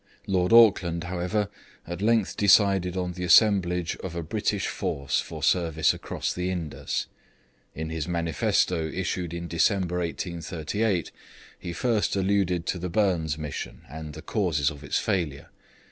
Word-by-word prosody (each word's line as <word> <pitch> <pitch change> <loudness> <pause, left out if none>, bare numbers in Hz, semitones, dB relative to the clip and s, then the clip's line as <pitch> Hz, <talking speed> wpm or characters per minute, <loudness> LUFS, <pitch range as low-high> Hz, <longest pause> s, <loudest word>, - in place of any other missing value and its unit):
Lord 90 -1 +1
Auckland, 95 -7 +5
however, 90 +4 -1 0.4
at 85 +2 -6
length 110 -2 +2
decided 95 -3 +4
on 90 -1 -1
the 90 +1 -6
assemblage 90 -2 +4
of 85 -2 -7
a 85 - -3
British 75 - -1
force 70 -1 -1
for - - -8
service 80 -4 +2
across - - -4
the 90 +1 -2
Indus. 85 -5 -3 0.7
In 80 +1 -4
his 80 -1 -3
manifesto 85 0 +1
issued 90 0 -3
in 85 0 -5
December 90 +1 +1
1838 85 +3 -2 0.5
he 85 - -5
first 110 +4 0
alluded 95 -3 +1
to 90 - -2
the 90 +1 -3
Burnes 85 -5 +1
mission, 75 -2 -6
and 75 +2 -8
the 80 - -9
causes 80 - 0
of 75 -1 -11
its 70 - -1
failure. 85 -10 -2
90 Hz, 145 wpm, -26 LUFS, 80-95 Hz, 0.7 s, Auckland